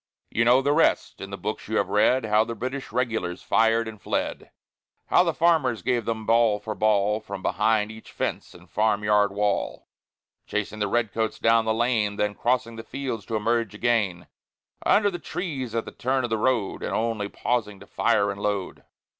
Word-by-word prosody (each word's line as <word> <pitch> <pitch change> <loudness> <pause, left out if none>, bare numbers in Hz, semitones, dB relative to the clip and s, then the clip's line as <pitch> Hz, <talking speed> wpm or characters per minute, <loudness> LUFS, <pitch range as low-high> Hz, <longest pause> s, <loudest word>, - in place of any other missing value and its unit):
You 115 - +2
know 125 +3 +5
the 145 +1 +2
rest. 165 - +1
In 95 - -6
the 100 - -6
books 105 +4 -5
you 110 +1 -1
have 100 - +1
read, 110 +5 +3
How 105 0 +3
the 115 +1 -5
British 130 +3 -5
Regulars 115 -7 -2
fired 115 +2 +2
and 110 -2 -9
fled, - - -3 0.6
How - - +5
the 170 - +1
farmers 155 -6 +2
gave 120 -3 0
them 110 -1 -3
ball 115 -2 +3
for 105 +1 -5
ball, 105 0 +2
From 100 -3 -8
behind 105 +1 +1
each 110 0 -12
fence - - -4
and - - -15
farm 105 -1 +1
yard 105 -1 +3
wall, 105 0 -1 0.6
Chasing 105 0 -3
the 105 - +1
red 120 -3 0
coats 110 -1 -1
down 115 0 +3
the 110 - +1
lane, 115 -3 +1
Then 105 0 0
crossing 115 0 -1
the 115 - -7
fields 125 -8 -5
to 115 - -2
emerge 115 0 0
again 105 -6 0 0.6
Under 205 -1 +4
the 175 - -5
trees 135 - -4
at 115 - -1
the - - -8
turn 130 +1 -1
of 120 - -3
the 110 - +2
road, 115 -4 0
And - - -2
only 110 -3 -1
pausing 105 -5 -2
to - - -13
fire 100 0 +1
and 100 0 -8
load. 100 -3 -2
110 Hz, 195 wpm, -25 LUFS, 105-120 Hz, 0.6 s, know